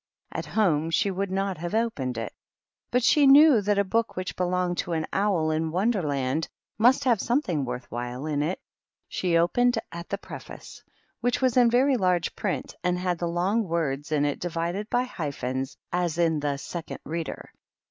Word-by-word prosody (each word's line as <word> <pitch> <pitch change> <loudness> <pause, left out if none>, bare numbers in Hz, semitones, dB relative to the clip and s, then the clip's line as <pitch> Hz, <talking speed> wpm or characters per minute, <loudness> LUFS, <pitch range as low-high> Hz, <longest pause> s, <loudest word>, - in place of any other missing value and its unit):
^' - - -27
At - - -6
home 165 -7 +1
she 195 +4 +1
would 195 +1 -2
not 190 -2 -2
have 175 +4 -3
opened 145 - -1
it, 115 -2 -4 0.6
but 250 0 +1
she 285 +3 +5
knew 280 -3 +8
that 205 0 +1
a 200 - +4
book 225 +4 -1
which 185 0 -4
belonged 180 -1 0
to 175 - -2
an 160 -1 -1
owl 190 -6 +1
in 160 +1 0
Wonderland 160 - 0 0.3
must 255 +5 +5
have 240 -6 +3
something 205 - 0
worth 125 0 -5
while 125 +3 -4
in 150 -2 -1
it. 165 +5 -1 0.5
She 175 -2 +1
opened 245 +9 +3
at 170 0 -8
the 200 - -1
preface, - - -10 0.4
which 245 0 0
was 255 -3 +2
in 245 -2 +6
very 260 +3 +3
large 180 -4 +1
print, - - -3
and 180 0 +1
had 180 -1 -1
the 175 - -1
long 185 +6 +1
words 150 -4 -2
in 145 -1 +2
it 145 - -1
divided 175 +5 -3
by 245 - +2
hyphens, 135 - -4 0.2
as 175 -2 0
in 165 -3 +2
the 145 -1 -1
"Second 165 +4 -6
Reader." 165 0 -5
175 Hz, 185 wpm, -26 LUFS, 155-215 Hz, 0.6 s, knew